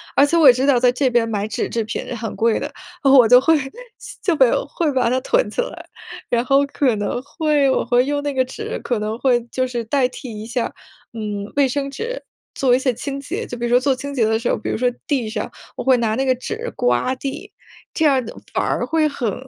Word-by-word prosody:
而 280 - +6
且 335 +4 +1
我 305 - +7
也 250 - +10
知 260 +2 0
道 255 -4 +4
在 250 0 +4
这 255 +1 +1
边 240 -1 +2
买 205 -1 -1
纸 215 - -2
制 230 - -1
品 220 +2 -5
很 225 -1 -5
贵 230 0 +2
的， - - -5 0.3
我 265 -4 +7
就 250 +2 +7
会 320 +4 +4 0.7
就 360 - +2
被 260 - +6
有， - - 0
会 325 0 -1
把 255 -2 +2
它 255 - +1
囤 - - +1
起 - - -1
来， - - -7 0.4
然 240 +1 +1
后 275 +1 +4
可 265 -5 +1
能 205 +4 -2
会 295 -1 +1
我 - - +1
会 245 +1 +3
用 285 +1 -1
那 290 - -2
个 260 -1 +1
纸 255 - -6
可 240 -3 -1
能 215 +2 -3
会 245 -3 +2
就 255 0 0
是 240 -2 -3
代 260 +2 +2
替 235 -4 -8
一 - - -7
下， 240 +1 -2 0.4
嗯， 210 -2 -5
卫 280 -2 +4
生 275 +1 -2
纸 475 - -5 0.3
做 250 -2 +3
一 - - +1
些 260 -2 0
清 275 +4 -5
洁。 275 - -4
就 245 - -6
比 240 - -6
如 235 - -1
说 245 +1 +5
做 265 0 +1
清 280 +2 -6
洁 235 -5 +2
的 220 0 +2
时 235 - -2
候， - - +1
比 - - -5
如 - - -1
说 245 +1 +1 0.2
地 255 -7 0
上 215 -1 -4 0.3
我 - - -3
会 260 -1 +5
拿 220 -2 0
那 270 +3 0
个 255 -1 +2
纸 450 - -5
刮 125 - +1
地， 290 +10 -6 0.4
这 320 - +1
样 275 -3 +4 0.3
反 - - 0
而 - - 0
会 315 -1 +2
很 245 -8 -2
255 Hz, 265 characters per minute, -20 LUFS, 235-280 Hz, 0.7 s, 也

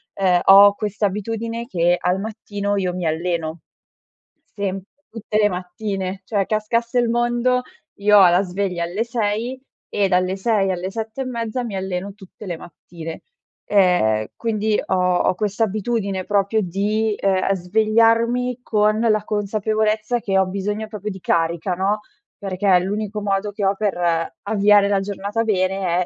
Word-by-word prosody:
uhm, 185 -2 +3
ho 200 +1 +8
questa 210 0 -2
abitudine 225 +4 -4
che 175 -2 +2
al 180 +2 0
mattino 205 -1 -3
io 180 -2 -1
mi 180 -2 -4
alleno. 165 0 -2 1.0
Semp 195 -2 -3 0.3
tutte 215 -1 -3
le 210 -1 +4
mattine. 190 +1 -4
Cioè, 200 -2 0
cascasse 230 +3 -1
il 240 -1 +1
mondo, 240 +1 +1 0.4
io 210 +1 +5
ho 190 -3 +8
la 175 +2 +4
sveglia 185 -2 -2
alle 185 +7 -2
6, 235 +2 -2 0.3
e 200 -1 +2
dalle 185 0 +1
6 195 -2 +1
alle 180 +1 -3
7 225 +4 -5
e - - -2
mezza, 235 0 -3
mi 225 -5 -5
alleno 190 +1 -4
tutte 200 +1 -13
le 175 -2 -4
mattine. 165 -1 -10 0.5
Ehm, 175 - +3
quindi, 215 -2 0
ho - - -1
ho 180 0 +2
questa 210 +2 0
abitudine 200 -2 -2
proprio 205 +1 +1
di, 205 +4 0
uhm, 195 0 +2
svegliarmi 230 +6 +2
con 215 -1 +2
la 215 -2 +2
consapevolezza 215 +2 0
che 195 -4 0
ho 190 - +3
bisogno 205 +3 -3
proprio 210 -1 -5
di 190 - -8
carica, 170 +1 0
no, 195 +4 0 0.4
perché 190 -1 +2
l'unico 205 +3 -3
modo 200 0 -1
che 205 -1 -3
ho 195 - +2
per 205 -1 -1 0.5
avviare 205 -1 +4
la 200 -1 +2
giornata 205 +3 -3
bene, 185 -3 0
205 Hz, 150 wpm, -21 LUFS, 185-220 Hz, 1.0 s, ho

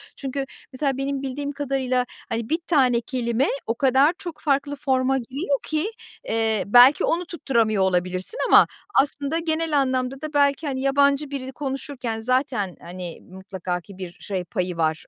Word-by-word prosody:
Çünkü 275 0 -4 0.3
mesela 270 0 -1
benim 275 0 -2
bildiğim 280 +1 -4
kadarıyla 265 -3 -1 0.2
hani 230 -1 -3
1 320 - +1
tane 255 -7 +3
kelime 240 +1 0 0.2
o 230 - 0
kadar 270 +5 +4
çok 345 -4 -7
farklı 285 -1 0
forma 265 -1 +1
giriyor 275 +3 -2
ki, 315 +8 -1 0.4
eee, 220 -2 +1
belki 245 +6 +7
onu 345 +2 0
tutturamıyor 230 - +1
olabilirsin 185 - -1
ama - - +7 0.3
aslında 285 +3 -2
genel 320 -2 0
anlamda 260 0 -1
da 310 0 -6
belki 285 +1 +2
hani 260 -2 -2
yabancı 280 +1 +2
birini 265 -2 -4
konuşurken 265 -4 -4
zaten 245 - 0
hani 175 -1 -7
mutlaka 185 -1 -5
ki 195 +2 -14
bir 185 -2 -6
şey 190 -3 -3
payı 180 0 -3
var 160 -1 0
265 Hz, 155 wpm, -23 LUFS, 225-285 Hz, 0.4 s, belki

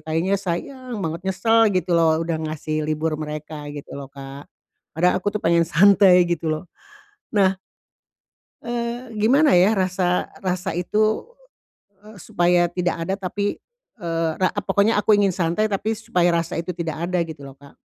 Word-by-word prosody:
kayaknya 175 +5 0
sayang 235 +7 -5
banget, 165 +1 -3
nyesel 225 +4 +4
gitu 180 -1 0
loh, 160 -1 +4
udah 165 -1 -2
ngasih 155 0 -3
libur 155 +1 -1
mereka, 150 0 -6
gitu 145 - -9
loh, 140 -1 -7
Kak, 140 0 -10 0.5
padahal, 180 +2 +3
aku 205 - -1
tuh - - -5
pengen 170 0 +3
santai, 185 +1 +6
gitu 170 -2 -2
loh. 155 +1 -2 0.7
Nah 190 -2 +3 1.1
eee, 235 0 -4
gimana 255 +7 +3
ya, 190 +4 +4
rasa 185 -1 0 0.2
rasa 185 -1 -2
itu, 215 - 0 0.7
eee, 215 0 -14
supaya 175 +1 +2
tidak 175 -2 -2
ada, 190 - -1
tapi, 200 +2 -3 0.4
eee, 165 -1 -1
ra 185 - +4
pokoknya 205 +2 +2
aku 215 - +3
ingin 200 -1 +3
santai, 175 +5 0
tapi 210 +2 -1
supaya 180 -5 +1
rasa 170 -1 -1
itu 175 +1 -5
tidak 165 -1 -4
ada, 180 - 0
gitu 155 -4 -10
loh 135 - -10
,Kak? 140 -1 -17
180 Hz, 160 wpm, -22 LUFS, 165-205 Hz, 1.1 s, santai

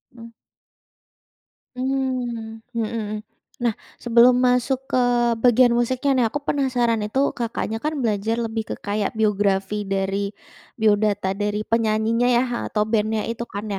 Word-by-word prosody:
Mmm. 230 0 -11 1.5
Mmm, 250 -4 -3 0.2
mhm. 215 -2 -2 0.4
Nah, 240 -3 0 0.2
sebelum 240 +1 +5
masuk 250 +1 +1
ke 255 -2 +1 0.4
bagian 245 0 +5
musiknya 255 +3 +1
nih. 250 -3 +3
Aku 290 - -3
penasaran, 245 -5 +1
itu 260 +7 0
Kakaknya 225 -1 -3
kan 305 0 -2
belajar 225 -2 0
lebih 225 -2 -3
ke - - -2
kayak 205 +1 -3
biografi 205 -1 +1
dari 195 0 -1 0.5
biodata 205 -3 +2
dari 210 +1 -2
penyanyinya 225 +1 +1
ya, 240 0 +4 0.3
atau 210 -1 0
band-nya 215 0 0
itu 230 0 -4
kan 200 +2 -5
225 Hz, 125 wpm, -22 LUFS, 210-245 Hz, 1.5 s, sebelum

